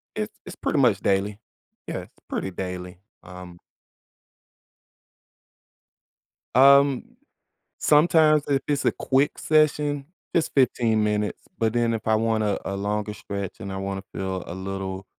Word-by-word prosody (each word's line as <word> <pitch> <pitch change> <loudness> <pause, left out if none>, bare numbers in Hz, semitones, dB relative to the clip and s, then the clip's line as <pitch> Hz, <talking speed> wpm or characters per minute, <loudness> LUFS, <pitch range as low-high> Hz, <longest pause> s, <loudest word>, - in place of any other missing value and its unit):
It's - - -4
it's - - -8
pretty - - -1
much - - +4
daily. 100 +1 0 0.5
Yeah, - - -3
it's - - -14 0.2
pretty 95 - -3
daily, 90 -1 -6 0.2
um 90 -1 -11 3.0
Um, 140 - +5 0.6
sometimes 155 -1 +4
if 135 -1 +1
it's 145 -1 0
a - - +3
quick 135 +2 +1
session, 150 -2 +2 0.3
just 165 - +1
15 115 -5 +2
minutes, 105 0 -1 0.2
but 115 -1 +1
then 120 -1 +2
if 110 - -4
I 110 - +4
wanna 110 -2 +1
a 100 - -3
longer 105 +1 -2
stretch 100 -2 -6
and 95 - -6
I - - -4
wanna 95 0 -4
feel 95 -1 -3
a 85 - -6
little, 95 0 -5
105 Hz, 135 wpm, -24 LUFS, 95-140 Hz, 3.0 s, Um